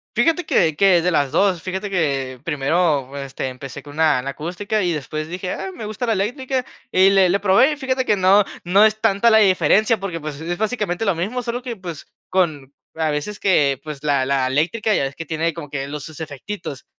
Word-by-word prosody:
Fíjate 330 Hz, +1 st, +2 dB
que 160 Hz, -, +2 dB
que 185 Hz, 0 st, +4 dB
de 180 Hz, -, +1 dB
las 145 Hz, -5 st, +1 dB
2, 180 Hz, +1 st, +2 dB
fíjate 190 Hz, +2 st, -4 dB
que 140 Hz, -8 st, -1 dB
primero, 145 Hz, -2 st, 0 dB
este, 135 Hz, -1 st, -5 dB
empecé 130 Hz, +1 st, -8 dB
con 145 Hz, +1 st, -12 dB
una, 155 Hz, -4 st, +2 dB
la 135 Hz, -, -5 dB
acústica 180 Hz, +8 st, -3 dB
y 175 Hz, -, +1 dB
después 155 Hz, 0 st, -4 dB
dije: 180 Hz, +2 st, -5 dB
"Ah, 190 Hz, 0 st, -4 dB
me 220 Hz, -, -7 dB
gusta 215 Hz, +3 st, -4 dB
la 230 Hz, -, +1 dB
eléctrica", 250 Hz, +6 st, -1 dB, 0.3 s
y 190 Hz, +1 st, +5 dB
le 195 Hz, -2 st, +4 dB
le 195 Hz, +3 st, +2 dB
probé, 205 Hz, +9 st, +4 dB
fíjate 260 Hz, -2 st, -1 dB
que 210 Hz, -, +3 dB
no 195 Hz, +2 st, +5 dB, 0.2 s
no 195 Hz, +5 st, +5 dB
es 215 Hz, 0 st, +1 dB
tanta 200 Hz, +4 st, +3 dB
la 220 Hz, -, +6 dB
diferencia, 205 Hz, +3 st, +3 dB
porque, 185 Hz, -4 st, -4 dB
pues, 150 Hz, -2 st, -6 dB
es 175 Hz, +2 st, -4 dB
básicamente 215 Hz, -4 st, -1 dB
lo 200 Hz, -5 st, +1 dB
mismo, 205 Hz, +10 st, -2 dB
solo 245 Hz, +1 st, -4 dB
que, 245 Hz, -2 st, -5 dB
pues, 175 Hz, -5 st, -8 dB, 0.2 s
con 155 Hz, -8 st, 0 dB, 0.2 s
a 160 Hz, -1 st, -1 dB
veces 150 Hz, +8 st, -3 dB
que, 140 Hz, -8 st, +2 dB
pues, 150 Hz, -2 st, -8 dB
la 140 Hz, -3 st, +2 dB
la 135 Hz, -1 st, +1 dB
eléctrica 165 Hz, -, 0 dB
ya -, -, +2 dB
ves 135 Hz, 0 st, -4 dB
que 165 Hz, -, -7 dB
tiene 160 Hz, +2 st, -1 dB
como 165 Hz, -2 st, -8 dB
que 135 Hz, -1 st, -3 dB
los 145 Hz, 0 st, -6 dB
sus 160 Hz, -1 st, -10 dB
efectitos, 155 Hz, 0 st, -7 dB
175 Hz, 215 wpm, -21 LUFS, 150-205 Hz, 0.3 s, la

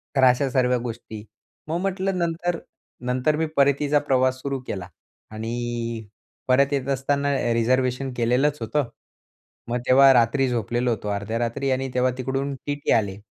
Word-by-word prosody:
तर 135 Hz, -, +3 dB
अशा 130 Hz, +2 st, +4 dB
सर्व्या 125 Hz, -1 st, +2 dB
गोष्टी. 115 Hz, -3 st, -7 dB, 0.4 s
मग 165 Hz, +2 st, -1 dB
म्हटलं 195 Hz, -1 st, -1 dB
नंतर 170 Hz, 0 st, -1 dB, 0.5 s
नंतर 130 Hz, +4 st, +1 dB
मी 160 Hz, +1 st, 0 dB
परतीचा 140 Hz, +1 st, +3 dB
प्रवास 130 Hz, -2 st, +1 dB
सुरू 140 Hz, -1 st, -2 dB
केला. 95 Hz, -3 st, -4 dB, 0.4 s
आणि 115 Hz, 0 st, -4 dB, 0.4 s
परत 135 Hz, +2 st, +3 dB
येत 135 Hz, -2 st, -1 dB
असताना 140 Hz, +1 st, 0 dB, 0.2 s
रिझर्व्हेशन 130 Hz, +3 st, +1 dB
केलेलंच 125 Hz, +5 st, +2 dB
होतं. 125 Hz, +3 st, -1 dB, 0.8 s
मग 120 Hz, +1 st, 0 dB
तेव्हा 135 Hz, +1 st, +7 dB
रात्री 125 Hz, +3 st, +3 dB
झोपलेलो 120 Hz, +1 st, -1 dB
होतो. 105 Hz, -2 st, -3 dB
अर्ध्या 100 Hz, +2 st, -2 dB
रात्री, 120 Hz, +3 st, -1 dB
आणि 130 Hz, +1 st, -1 dB
तेव्हा 125 Hz, 0 st, +2 dB
तिकडून 135 Hz, +2 st, -2 dB
टीटी 145 Hz, 0 st, -2 dB
आले. 100 Hz, -3 st, +1 dB
130 Hz, 145 wpm, -24 LUFS, 120-140 Hz, 0.8 s, तेव्हा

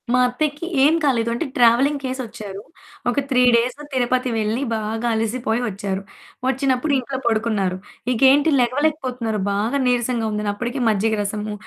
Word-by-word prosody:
మా 250 Hz, -, +4 dB
అత్తయ్యకి 295 Hz, +5 st, -2 dB, 0.2 s
ఏం 300 Hz, +3 st, +5 dB
కాలేదు 235 Hz, -5 st, +2 dB
అంటే, 235 Hz, -, -2 dB
ట్రావెలింగ్ 250 Hz, +5 st, +4 dB
చేసొచ్చారు 220 Hz, -6 st, -6 dB, 0.5 s
ఒక 245 Hz, -, +1 dB
3 255 Hz, -2 st, +3 dB
డేస్ 240 Hz, +1 st, +1 dB, 0.2 s
'తిరుపతి' 255 Hz, -1 st, 0 dB
వెళ్ళి, 220 Hz, +3 st, -1 dB
బాగా 220 Hz, +2 st, -2 dB
అలిసిపోయి 225 Hz, +1 st, -1 dB
వచ్చారు. 195 Hz, -1 st, -3 dB, 0.5 s
వచ్చినప్పుడు 265 Hz, +2 st, +1 dB
ఇంట్లో 265 Hz, +1 st, -4 dB
పడుకున్నారు. 215 Hz, -5 st, 0 dB, 0.3 s
ఇకేంటి 270 Hz, +5 st, +5 dB
లెగవలేకపోతున్నారు 255 Hz, -4 st, -1 dB
బాగా 220 Hz, +8 st, 0 dB
నిరసంగుందని 225 Hz, -4 st, 0 dB
అప్పటికి 245 Hz, +5 st, -4 dB
మజ్జిగ 220 Hz, +1 st, +1 dB
రసము, 210 Hz, +1 st, -3 dB
240 Hz, 130 wpm, -21 LUFS, 220-260 Hz, 0.5 s, ఏం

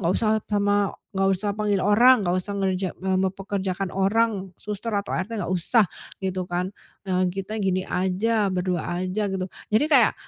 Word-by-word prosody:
nggak 170 Hz, -, 0 dB
usah 220 Hz, -1 st, +2 dB
pama 205 Hz, -1 st, +2 dB, 0.3 s
nggak 195 Hz, 0 st, +3 dB
usah 205 Hz, +2 st, -2 dB
panggil 205 Hz, -2 st, +1 dB
orang, 235 Hz, +5 st, +6 dB
nggak 175 Hz, -, +2 dB
usah 200 Hz, +3 st, -5 dB
ngerja 190 Hz, -1 st, 0 dB
eee, 190 Hz, 0 st, +1 dB
mempekerjakan 190 Hz, 0 st, -2 dB
orang, 195 Hz, 0 st, +1 dB
suster, 210 Hz, +2 st, -4 dB
atau 200 Hz, 0 st, -1 dB
ART, 190 Hz, +5 st, -3 dB
nggak 185 Hz, -1 st, -2 dB
usah," 205 Hz, +6 st, +3 dB, 0.4 s
gitu 190 Hz, -1 st, -2 dB
kan, 180 Hz, +2 st, -2 dB, 0.4 s
"eee, 185 Hz, 0 st, +2 dB
kita 195 Hz, +3 st, -5 dB
gini 185 Hz, -1 st, +1 dB
aja, 200 Hz, +4 st, +1 dB
berdua 180 Hz, -2 st, -1 dB, 0.2 s
aja" 200 Hz, +3 st, -1 dB
gitu. 190 Hz, -1 st, -2 dB, 0.3 s
Jadi 220 Hz, +7 st, +4 dB
kayak, 260 Hz, -7 st, +5 dB
195 Hz, 170 wpm, -24 LUFS, 185-210 Hz, 0.4 s, orang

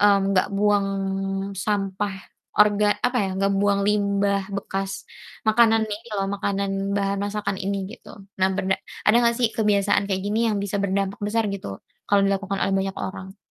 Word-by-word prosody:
mmm, 205 Hz, -1 st, +6 dB
nggak 185 Hz, -, +3 dB
buang 205 Hz, -1 st, +3 dB, 0.8 s
sampah 200 Hz, -1 st, -1 dB, 0.4 s
orga 210 Hz, 0 st, +5 dB, 0.2 s
apa 250 Hz, 0 st, -1 dB
ya, -, -, -1 dB
nggak 195 Hz, 0 st, +2 dB
buang 200 Hz, 0 st, +2 dB
limbah 200 Hz, -1 st, +2 dB, 0.2 s
bekas 195 Hz, 0 st, -3 dB, 0.6 s
makanan 225 Hz, 0 st, +5 dB
ini 230 Hz, +3 st, -7 dB
loh, 195 Hz, -, 0 dB
makanan 200 Hz, -1 st, -1 dB, 0.3 s
bahan 200 Hz, 0 st, 0 dB
masakan 205 Hz, 0 st, -2 dB
ini, 200 Hz, +1 st, -1 dB, 0.2 s
gitu. 245 Hz, -, -14 dB, 0.3 s
Nah, 190 Hz, -, +4 dB
bena 190 Hz, 0 st, +1 dB, 0.3 s
ada 210 Hz, -, +6 dB
nggak 235 Hz, -1 st, +3 dB
sih 240 Hz, -2 st, +3 dB
kebiasaan 205 Hz, -2 st, +2 dB
kayak 190 Hz, -, +1 dB
gini 210 Hz, +2 st, 0 dB
yang 210 Hz, -, 0 dB
bisa 200 Hz, 0 st, -2 dB
berdampak 195 Hz, 0 st, -1 dB
besar 225 Hz, +1 st, +1 dB
gitu, 200 Hz, -, -7 dB, 0.4 s
kalau 200 Hz, -1 st, +4 dB
dilakukan 195 Hz, 0 st, -1 dB
oleh 195 Hz, -, +1 dB
banyak 195 Hz, 0 st, -2 dB
orang? 190 Hz, +1 st, -6 dB
200 Hz, 165 wpm, -24 LUFS, 195-210 Hz, 0.8 s, mmm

